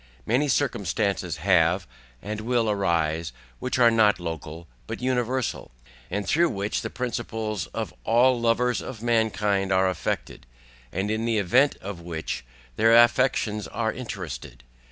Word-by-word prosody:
Many 130 +6 +2
circumstances 100 - 0
have, - - +3 0.4
and 105 +1 -4
will 120 0 +1
arise, 85 -5 0 0.3
which 130 - -2
are 120 -2 +6
not 110 -4 +4
local, 80 -1 -6 0.2
but - - -5
universal, 125 0 -1 0.4
and 100 0 -3
through 170 +7 +3
which 100 +1 -2
the - - -4
principles 110 -5 -3
of - - -5
all 120 +2 +3
Lovers 120 +1 +2
of 115 -4 -8
Mankind 105 -4 +1
are 95 0 +3
affected, 80 -7 -3 0.4
and 95 +4 -2
in 110 +1 -1
the 115 -1 +1
Event 125 +9 +3
of 95 -3 -6
which, 80 -5 -4 0.3
their 115 +1 +5
Affections 120 -3 +3
are 110 -1 -2
interested. 95 - -7
110 Hz, 135 wpm, -25 LUFS, 95-120 Hz, 0.4 s, are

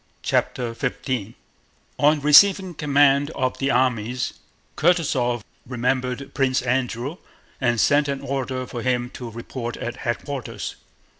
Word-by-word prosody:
CHAPTER 120 -2 0
XV 125 -3 -3 0.6
On 150 +1 +4
receiving 185 +5 +6
command 145 -1 +3
of 130 -1 -1
the 135 - 0
armies 125 -1 0 0.4
Kutúzov 135 - +1 0.2
remembered 125 +2 -2
Prince 130 -2 +1
Andrew 125 +3 -1 0.4
and 120 -3 +2
sent 145 +4 +4
an 140 -1 -2
order 130 -1 -3
for 120 -1 -6
him 125 0 0
to 125 -3 -7
report 115 +1 -6
at 120 - -5
headquarters. 130 +1 -4
130 Hz, 120 wpm, -23 LUFS, 120-140 Hz, 0.6 s, receiving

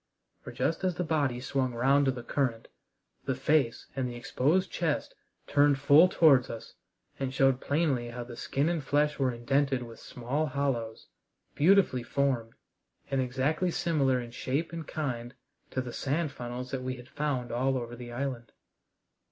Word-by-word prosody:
For - - -8
just 165 - -1
as 185 -2 +1
the 180 - -1
body 145 -7 0
swung 130 -1 -1
round 135 +4 +3
to 135 - +3
the 125 -2 -7
current 120 -5 -1 0.6
the 135 -2 0
face 135 -2 +1
and 130 -2 -1
the 120 - -7
exposed 150 +9 +1
chest 160 -4 -1 0.3
turned 145 -1 +4
full 145 +5 +7
towards 140 -8 +5
us, 115 -1 -8 0.5
and 135 -1 -2
showed 135 -1 +3
plainly 140 -6 0
how 120 0 -5
the 120 0 -9
skin 140 +5 -1
and 170 -3 -1
flesh 150 +2 +1
were 130 -2 +2
indented 135 +2 0
with 115 -1 -11
small 135 +6 -2
hollows, 130 -5 -2 0.5
beautifully 170 -5 +4
formed, 120 -2 -1 0.6
and 135 -1 +2
exactly 135 +8 0
similar 140 -7 +1
in 120 -1 -7
shape 140 +7 -2
and 165 -2 -6
kind 125 -5 -4 0.3
to 130 - -2
the 125 -2 -7
sand 150 +2 -1
funnels 125 -1 -6
that 135 - -2
we 130 0 -3
had 125 0 -12
found 140 -5 -2
all 130 +3 +1
over 120 -1 -5
the 120 0 -9
island. 120 -2 -4
135 Hz, 170 wpm, -29 LUFS, 125-145 Hz, 0.6 s, full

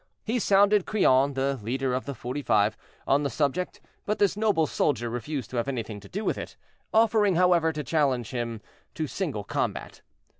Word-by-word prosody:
He 235 +3 -1
sounded 205 -1 +4
Crillon, 140 -9 +3
the 135 0 0
leader 130 +4 -1
of 130 - -2
the 140 - -4
"Forty 125 +5 -4
five," 105 -4 +2 0.3
on 140 +1 +3
the 140 - -1
subject, 145 +7 -1 0.2
but 210 - -1
this 200 -1 +2
noble 210 -7 +2
soldier 120 -6 0
refused 125 +1 -4
to 125 - -4
have 120 - 0
anything 115 -6 -4
to 100 - -14
do 205 +3 -4
with - - 0
it, - - -8 0.3
offering, 215 -3 +3
however, 175 -2 +4
to 150 -1 -4
challenge 130 -5 0
him 115 -3 -3 0.3
to 155 - -2
single 145 - -3
combat. - - -3
140 Hz, 185 wpm, -27 LUFS, 120-185 Hz, 0.3 s, sounded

